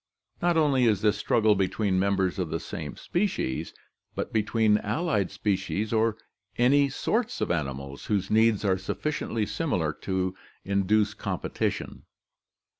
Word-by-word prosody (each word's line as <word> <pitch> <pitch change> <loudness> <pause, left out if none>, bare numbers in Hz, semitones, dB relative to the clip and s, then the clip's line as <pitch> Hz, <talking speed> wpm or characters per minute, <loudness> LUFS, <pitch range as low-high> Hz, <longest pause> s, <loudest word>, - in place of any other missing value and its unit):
Not 175 -1 +2
only 140 -5 +3
is 105 -4 +3
this 105 -1 +4
struggle 110 0 +3
between 95 0 0
members 95 -1 +1
of 90 -3 -1
the 80 +1 -2
same - - -6
species, 175 - -2 0.4
but - - -4
between 110 0 +3
allied 105 - 0
species 100 +2 -1
or 110 0 +2 0.4
any 140 +3 +4
sorts 225 - -1
of - - 0
animals 70 -4 -3
whose 100 -3 0
needs 110 -1 +3
are 95 -1 +2
sufficiently 115 +1 -2
similar 90 - -1
to 95 +2 -2 0.3
induce 100 +2 +2
competition. - - -3
105 Hz, 130 wpm, -27 LUFS, 95-115 Hz, 0.4 s, this